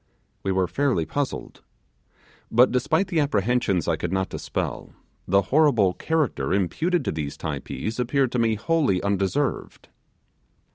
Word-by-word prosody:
We 95 - -1
were 95 -1 +2
fairly 120 - 0
puzzled. 140 - -4 0.9
But 120 +3 +5
despite 160 +9 +1
the 170 -4 +1
apprehensions 115 - +1
I 85 -2 +1
could 85 - -3
not 95 0 -1
dispel, - - -4 0.3
the 100 +1 +3
horrible 120 -12 +4
character 140 - 0
imputed 160 - 0
to - - 0
these 75 -2 -4
Typees 110 +3 -4
appeared 130 +1 +1
to 125 - -1
be 115 -1 +2
wholly 140 - +1
undeserved. 100 +8 -1
115 Hz, 135 wpm, -24 LUFS, 95-145 Hz, 0.9 s, But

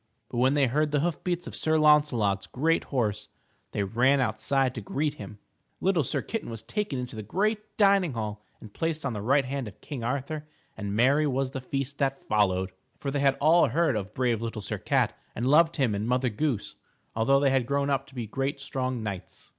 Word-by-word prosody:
But 120 - -3
when 130 +3 +4
they 140 -2 +4
heard 150 +5 +1
the 145 -1 +1
hoof 170 -1 -2
beats 175 -1 -2
of - - -7
Sir 160 0 +1
Launcelot's 145 -10 +3
great 160 +6 +1
horse, 105 -6 -1 0.4
they 100 - -1
ran 125 +8 +3
outside 130 +3 +1
to 115 - -5
greet 145 +8 -1
him. 105 -6 -9 0.4
Little 185 -5 +2
Sir - - -1
Kitten 225 - -4
was 115 -1 -6
taken 150 - -2
into 125 -2 -5
the 110 - -5
great 210 - -2
dining 195 -6 +4
hall 105 -2 -4 0.2
and 105 -2 -12
placed 160 -2 -2
on 130 - -1
the 105 - -4
right 135 +5 +3
hand 135 -2 -3
of 100 - -11
King 135 -6 -6
Arthur 140 +5 -3 0.3
and 100 -1 -4
merry 140 +6 +4
was 135 -1 -1
the 135 -1 -5
feast 135 +2 -4
that 135 -1 0
followed, 95 -3 +2 0.3
for 140 - -3
they 145 - -1
had 135 -1 +3
all 165 +4 +5
heard 155 0 +1
of 105 0 -4
brave 120 -3 +1
Little 115 -2 -4
Sir 100 - -3
Cat - - +1 0.2
and 120 - -2
loved 160 +5 +5
him 130 -8 +1
and 105 +2 -2
Mother 125 +1 +1
Goose, 120 -1 -2 0.4
although 135 +5 +3
they 140 -1 +3
had 130 -3 +1
grown 140 +1 0
up 135 0 0
to 135 - -17
be 120 -2 -3
great 135 +6 -2
strong 130 -3 -3
knights. 100 -4 -7
135 Hz, 215 wpm, -27 LUFS, 115-150 Hz, 0.4 s, all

